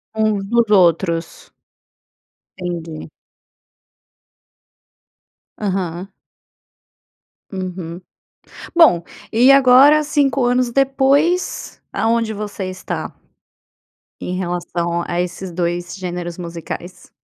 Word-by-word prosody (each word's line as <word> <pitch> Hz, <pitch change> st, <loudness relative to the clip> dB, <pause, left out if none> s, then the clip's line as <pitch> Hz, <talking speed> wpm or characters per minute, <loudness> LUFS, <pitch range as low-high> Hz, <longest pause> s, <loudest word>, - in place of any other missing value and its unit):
Uns 215 Hz, -2 st, 0 dB
dos 235 Hz, -2 st, +2 dB
outros. 170 Hz, -3 st, +1 dB, 1.1 s
Entendi. 170 Hz, -3 st, -6 dB, 2.5 s
Aham. 190 Hz, -2 st, -3 dB, 1.4 s
Uhum. 180 Hz, -2 st, -6 dB, 0.7 s
Bom, 315 Hz, -, +6 dB, 0.3 s
e 245 Hz, +4 st, +6 dB
agora 275 Hz, +3 st, +6 dB
5 280 Hz, -3 st, +1 dB
anos 245 Hz, 0 st, +1 dB
depois, 275 Hz, +6 st, +1 dB
aonde 225 Hz, 0 st, 0 dB
você 205 Hz, -2 st, -5 dB
está? 185 Hz, 0 st, -5 dB, 1.1 s
Em 180 Hz, -, -3 dB
relação 175 Hz, -1 st, -2 dB
a 175 Hz, -, -2 dB
esses 180 Hz, +1 st, -5 dB
2 175 Hz, 0 st, -3 dB
gêneros 175 Hz, -2 st, -5 dB
musicais? 170 Hz, +1 st, -8 dB
190 Hz, 75 wpm, -19 LUFS, 175-245 Hz, 2.5 s, Bom